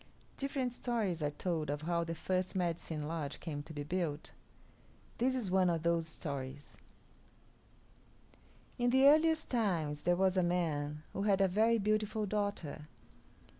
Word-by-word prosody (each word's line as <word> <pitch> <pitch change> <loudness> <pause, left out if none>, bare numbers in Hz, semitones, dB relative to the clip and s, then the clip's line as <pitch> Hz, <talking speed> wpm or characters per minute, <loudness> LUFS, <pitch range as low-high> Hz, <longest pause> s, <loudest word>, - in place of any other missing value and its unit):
Different 270 -3 -2
stories 220 -9 -1
are 145 - +1
told 155 0 -2
of 145 +1 -2
how 170 +1 +1
the 165 0 -4
first 185 +3 -1
Medicine 170 -4 -2
Lodge 155 -3 -4
came 150 -3 -4
to 160 - -11
be 145 -2 -4
built. 160 -1 -2 0.9
This 260 +2 +2
is 220 -8 -1
one 185 -1 +4
of 165 -2 -1
those 170 -1 +1
stories: 140 -3 -6 2.0
In 245 0 +3
the 265 +2 +5
earliest 315 +2 +4
times 170 - 0
there 175 +2 +3
was 190 +1 +2
a - - +5
man 155 -4 -1
who 195 - -3
had 200 -1 +3
a 195 - +5
very 220 +5 +3
beautiful 215 +1 0
daughter. 200 -7 -3
175 Hz, 150 wpm, -34 LUFS, 155-215 Hz, 2.0 s, the